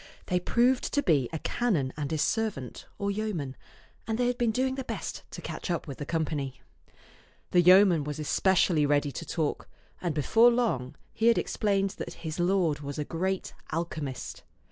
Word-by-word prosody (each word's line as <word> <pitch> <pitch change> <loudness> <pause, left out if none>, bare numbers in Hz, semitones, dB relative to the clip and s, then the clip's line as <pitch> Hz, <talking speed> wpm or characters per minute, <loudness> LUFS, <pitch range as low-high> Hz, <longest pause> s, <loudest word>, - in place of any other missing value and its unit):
They 180 - +1
proved 245 +7 +2
to 285 - +2
be 140 -8 +2
a 160 - -2
canon 160 - 0
and 145 -2 -3
his 155 -2 0
servant, 210 - -2
or 200 -1 -1
yeoman, 195 -11 -3 0.5
and 220 -1 -1
they 245 - +1
had 245 0 0
been 240 -2 +2
doing 260 +4 +1
their 265 0 -4
best - - -5
to - - -9
catch - - -5
up 170 - -1
with 140 - -7
the 145 - -5
company. 150 -5 -2 0.9
The 175 - +5
yeoman 180 -2 +6
was 150 0 -4
especially 160 0 +2
ready 145 0 +2
to 165 - -6
talk, 155 -4 -2 0.3
and 170 -4 -1
before 225 - +5
long 225 - 0 0.2
he 225 - +1
had 235 - +5
explained 195 -2 0
that - - -4
his 160 0 -6
lord 175 -4 +2
was 145 0 -6
a 150 - -2
great 185 +4 -2 0.2
alchemist. 155 -5 -4
175 Hz, 180 wpm, -28 LUFS, 150-215 Hz, 0.9 s, yeoman